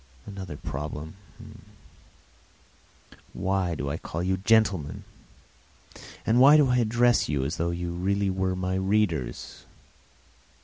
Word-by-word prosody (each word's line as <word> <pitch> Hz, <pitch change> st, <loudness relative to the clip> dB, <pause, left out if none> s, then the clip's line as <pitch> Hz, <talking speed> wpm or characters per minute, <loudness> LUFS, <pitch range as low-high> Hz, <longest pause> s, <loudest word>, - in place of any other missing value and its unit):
And 100 Hz, -, -9 dB
another 95 Hz, -7 st, -7 dB
problem: 75 Hz, +3 st, -6 dB, 2.2 s
why 95 Hz, -2 st, -1 dB
do 70 Hz, -, -4 dB
I 80 Hz, -, -3 dB
call 85 Hz, +2 st, -5 dB
you 95 Hz, +1 st, 0 dB
"gentlemen," 95 Hz, -7 st, +1 dB, 1.2 s
why 130 Hz, +6 st, +6 dB
do 145 Hz, -3 st, +4 dB
I 125 Hz, -, +3 dB
address 120 Hz, +1 st, +2 dB
you 70 Hz, -3 st, 0 dB
as 75 Hz, -, -3 dB
though 85 Hz, +1 st, -1 dB
you 85 Hz, 0 st, -3 dB
really 100 Hz, +2 st, 0 dB
were 95 Hz, 0 st, -1 dB
my 90 Hz, 0 st, -2 dB
readers? 95 Hz, -, -1 dB
95 Hz, 120 wpm, -26 LUFS, 85-105 Hz, 2.2 s, why